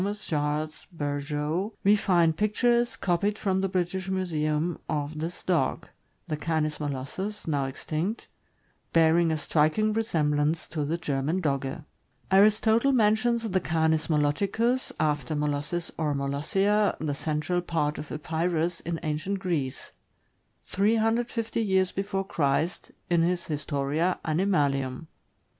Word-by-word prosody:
Charles 155 -5 -2
Berjeau, 150 +5 -2
we 205 +2 +6
find 175 -5 +3
pictures, 235 +4 +2
copied 200 +3 0
from 190 -3 0
the 195 - 0
British 185 +1 -2
Museum, 165 -3 -1
of 150 0 -2
this 165 +3 -4
dog 165 -8 0 0.2
— - - -44
the 155 - -1
Canis 155 -1 -1
molossus, 150 +9 -4
now 145 -3 +1
extinct 155 - -3 0.3
— - - -41
bearing 165 +1 +4
a 160 - 0
striking 155 +8 +2
resemblance 155 -7 0
to 155 -3 -2
the 160 +4 -1
German 150 +2 -1
Dogge. 140 -2 -2 0.5
Aristotle 220 +6 +5
mentions 230 0 +2
the 185 - +3
Canis 160 -2 +1
moloticus 200 - +1
— - - -32
after 145 0 -5
Molossis 150 +3 -1
or 150 -3 0
Molossia, 195 +10 +1
the 150 -2 -1
central 155 +4 -1
part 160 -4 -1
of 150 - -8
Epirus, 165 +2 -1
in 165 -1 -4
ancient 155 +6 -2
Greece 165 -9 -3 0.4
— - - -45
350 225 +3 +1
years 190 -3 +2
B. 195 - -2
C., 195 -1 -2 0.9
in 170 -1 +4
his 175 +1 0
"Historia 150 +3 -1
Animalium." 145 -6 +1
165 Hz, 130 wpm, -27 LUFS, 150-195 Hz, 0.9 s, we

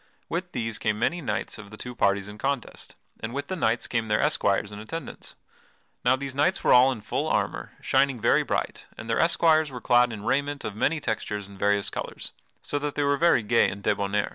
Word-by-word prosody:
With 175 +1 -3
these 115 -3 -2
came 105 -1 0
many 170 +10 0
knights 105 -9 -3
of 105 -1 -10
the 110 - -11
two 125 +2 -7
parties 100 -3 +1
in 105 0 -10
contest, 135 -1 -3 0.2
and 115 +4 -5
with 140 0 -4
the 185 - -2
knights 115 -9 +1
came 115 -2 -1
their 105 0 +2
esquires 105 -9 +1
in 105 - -8
attendance. 165 +10 -7 0.7
Now 125 +1 +4
these 135 0 -6
knights 150 +8 +1
were - - +5
all 125 +2 +7
in 120 -5 -5
full - - -2
armor, - - -1
shining 135 -3 +2
very - - +4
bright, - - -3
and - - -8
the - - +1
esquires 160 -2 +4
were 125 -2 -7
clad 120 0 +4
in 105 -2 -7
raiment 140 +4 -1
of 105 - -4
many 155 +8 +1
textures 105 -5 -3
and 100 -1 -14
various 100 0 +1
colors, - - -6 0.3
so 145 - -2
that 145 0 -3
they 145 - +1
were 140 0 +3
very 155 -6 +3
gay 115 +3 +3
and 100 +1 -8
debonair. 100 0 0
120 Hz, 220 wpm, -26 LUFS, 105-145 Hz, 0.7 s, all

